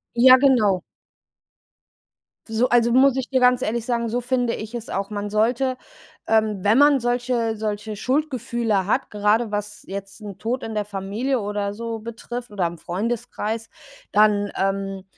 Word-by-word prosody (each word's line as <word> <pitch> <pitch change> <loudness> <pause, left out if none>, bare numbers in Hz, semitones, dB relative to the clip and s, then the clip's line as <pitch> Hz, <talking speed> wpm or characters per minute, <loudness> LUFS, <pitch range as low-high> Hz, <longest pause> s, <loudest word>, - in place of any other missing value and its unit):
Ja, 255 +2 +8
genau. 225 -9 +3 1.7
So, 225 +3 +1
also 235 -1 +3
muss 265 0 +5
ich 260 - -3
dir 260 -2 +1
ganz 250 0 +4
ehrlich 230 +1 -2
sagen, 235 -2 -1
so 245 +2 -1
finde 245 -1 0
ich 215 +2 -7
es 235 -1 -6
auch, 195 +1 -3
man 205 0 -4
sollte, 245 +5 +1 0.5
ähm, 215 -2 +2
wenn 210 +4 +4
man 285 -1 +6
solche 240 -2 0
solche 210 0 -3
Schuldgefühle 240 -7 0
hat, 255 +6 0
grade 210 +2 +1
was 210 0 -4
jetzt 195 +2 -7
'n 200 -3 -8
Tod 240 +5 -3
in 225 - -5
der 210 -1 -1
Familie 210 +6 -2
oder 205 0 -2
so 230 0 -5
betrifft 235 +1 -7
oder 190 -4 -1
im 170 0 -8
Freundeskreis, 220 +3 -3 0.4
dann, 205 -1 +3
ähm, 195 0 -2
225 Hz, 160 wpm, -23 LUFS, 205-245 Hz, 1.7 s, Ja